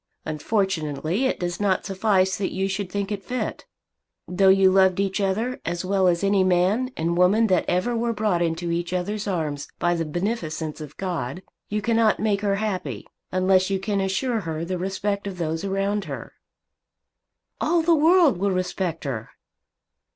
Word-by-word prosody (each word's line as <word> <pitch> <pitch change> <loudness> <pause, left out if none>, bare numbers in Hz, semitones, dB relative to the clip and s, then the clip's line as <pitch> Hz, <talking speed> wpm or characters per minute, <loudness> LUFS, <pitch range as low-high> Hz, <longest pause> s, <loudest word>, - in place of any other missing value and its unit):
Unfortunately 160 - -1
it 260 - 0
does 175 -1 -3
not 200 -3 +1
suffice 190 -1 +2
that 195 - -2
you 190 +1 -1
should 195 -1 -3
think 200 +1 -2
it 200 -2 -3
fit. 255 - -4 0.6
Though 190 +2 +3
you 190 0 +6
loved 190 -1 +4
each 195 +1 0
other 220 +6 -1
as 170 +2 -3
well 190 0 +2
as 175 +1 +2
any 200 -1 +3
man 185 +7 +2
and 170 +2 0
woman 190 +6 +4
that 180 - +2
ever 185 +7 +1
were 235 +1 0
brought 210 -5 0
into 170 0 -1
each 170 +1 -2
other's 205 +4 -2
arms 155 -7 -2
by 175 0 +1
the 165 -1 -1
beneficence 160 -2 -3
of 150 -1 -9
God, 180 -3 -3 0.3
you 210 0 -2
cannot 225 -1 +3
make 205 -2 +1
her 200 -1 +1
happy, 185 - -3 0.3
unless 185 0 +3
you 195 - +1
can 200 0 -1
assure 220 +5 0
her 165 -3 -4
the 180 0 -3
respect 200 +2 -2
of 190 -2 -6
those 165 0 -2
around 195 +1 -1
her." - - -7 1.3
"All 335 +1 +2
the 335 +1 +4
world 325 - +5
will 200 +2 +1
respect 185 -2 -2
her." 115 -6 -4
190 Hz, 175 wpm, -24 LUFS, 175-205 Hz, 1.3 s, you